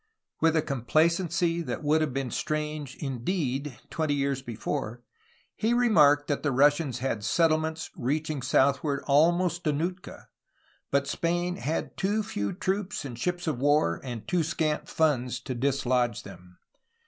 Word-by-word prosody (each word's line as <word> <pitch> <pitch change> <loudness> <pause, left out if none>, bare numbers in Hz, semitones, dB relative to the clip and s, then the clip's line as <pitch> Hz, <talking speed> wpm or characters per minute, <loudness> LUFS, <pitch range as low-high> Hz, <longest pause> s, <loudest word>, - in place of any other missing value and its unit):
With 165 0 +3
a 160 - +2
complacency 165 +5 +1
that 165 - -4
would 155 +2 +3
have 155 -3 0
been 135 -1 -3
strange 150 -2 -3
indeed, 135 -1 -3
twenty 155 -3 0
years 140 -1 -1
before, 120 -1 -4 0.5
he 230 +2 +1
remarked 150 -12 +5
that 145 - -1
the 145 - 0
Russians 145 0 +3
had 120 -4 -2
settlements 160 +4 +1
reaching 150 +3 -2
south 135 +2 +2
ward 145 -2 -1
almost 175 +4 +3
to 155 - +3
Nootka, 175 +5 -4 0.6
but 140 0 +1
Spain 175 +3 -1
had 155 +6 -3
too 205 +3 0
few 100 - -3
troops 190 -2 -2
and 120 -3 -7
ships 175 +4 -2
of 155 -7 -1
war 145 - +2
and 120 -4 -6
too 180 - +1
scant 155 -1 -1
funds 130 -6 +1
to 130 - -4
dislodge 125 -4 0
them. 90 0 -13
150 Hz, 150 wpm, -27 LUFS, 130-165 Hz, 0.6 s, remarked